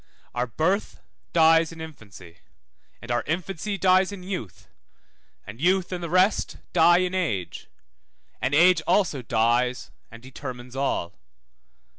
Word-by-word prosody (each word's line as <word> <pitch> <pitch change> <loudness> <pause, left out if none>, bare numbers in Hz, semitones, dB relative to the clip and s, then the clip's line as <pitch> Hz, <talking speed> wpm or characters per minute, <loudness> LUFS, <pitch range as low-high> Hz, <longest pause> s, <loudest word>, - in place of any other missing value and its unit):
Our 125 +1 -1
birth 165 - -1 0.3
dies 165 0 +4
in 165 - -11
infancy, 105 - -12 0.6
and 120 - -6
our 120 - +1
infancy 185 +4 -3
dies 185 0 +3
in 195 -3 -8
youth, 180 - -7 0.8
and 105 +6 -10
youth 185 +2 +2
and 180 -1 -4
the 170 - -4
rest 185 +4 +2 0.2
die 175 0 +6
in 180 0 0
age, 110 - -3 0.7
and 130 +3 0
age 175 +1 +5
also 175 -7 +2
dies 120 +1 0 0.2
and 115 +1 -13
determines 130 -1 -9
all. 135 -10 -2
160 Hz, 130 wpm, -25 LUFS, 120-185 Hz, 0.8 s, die